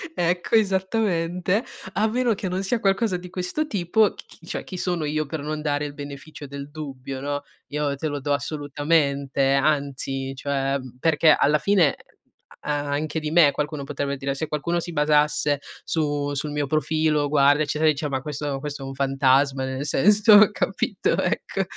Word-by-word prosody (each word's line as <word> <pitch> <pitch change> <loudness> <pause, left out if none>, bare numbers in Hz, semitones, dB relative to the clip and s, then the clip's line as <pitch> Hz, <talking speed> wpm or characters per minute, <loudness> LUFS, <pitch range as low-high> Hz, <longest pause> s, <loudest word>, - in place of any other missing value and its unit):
Ecco, 175 +5 0
esattamente. 190 -2 +1 0.3
A 210 +4 +2
meno 240 +1 +1
che 190 -2 -4
non 185 +1 -2
sia 230 +5 0
qualcosa 195 +1 +1
di 180 0 -10
questo 185 - -2
tipo, 205 - +2
c - - -12
chi 165 - -17
cioè, - - -4
chi - - -8
sono 175 -3 -1
io 155 +1 -1
per 155 +2 -5
non 150 +1 -4
dare 145 -1 -1
il 145 - -6
beneficio 145 +1 -9
del 140 0 -8
dubbio, 135 -3 -7
no, 145 0 -3 0.2
io 145 -1 -1
te 155 +3 -3
lo 145 -1 -3
do 145 +1 -1
assolutamente, 140 -2 0
anzi, 140 -2 0
cioè, 135 0 -1
mhmm, 130 -2 -11
perché, 160 +2 +3
alla 150 +1 +4
fine, 180 -3 +3 0.7
uhm, - - -4
a 145 0 -2
anche 150 +2 -1
di 150 0 -3
me 160 -4 +6
qualcuno 150 -1 -3
potrebbe 140 -1 -3
dire 135 0 -2
se 160 +3 -3
qualcuno 155 +3 -1
si 175 - -6
basasse 150 -1 +2 0.3
su 145 -3 -1
sul 145 +2 -3
mio 145 -1 -1
profilo, 155 0 +1
guarda, 145 +1 +4
eccetera, 155 +1 -1
ecc - - +4
dice: 150 0 -2
"Ma 135 -1 -2
questo 145 -1 -4
questo 145 -1 -6
è - - -5
un 135 - -6
fantasma", 135 0 +2
nel 130 +2 -3
senso, 210 +7 +6
capito, - - -1
ecco, - - -1
150 Hz, 180 wpm, -24 LUFS, 140-170 Hz, 0.7 s, me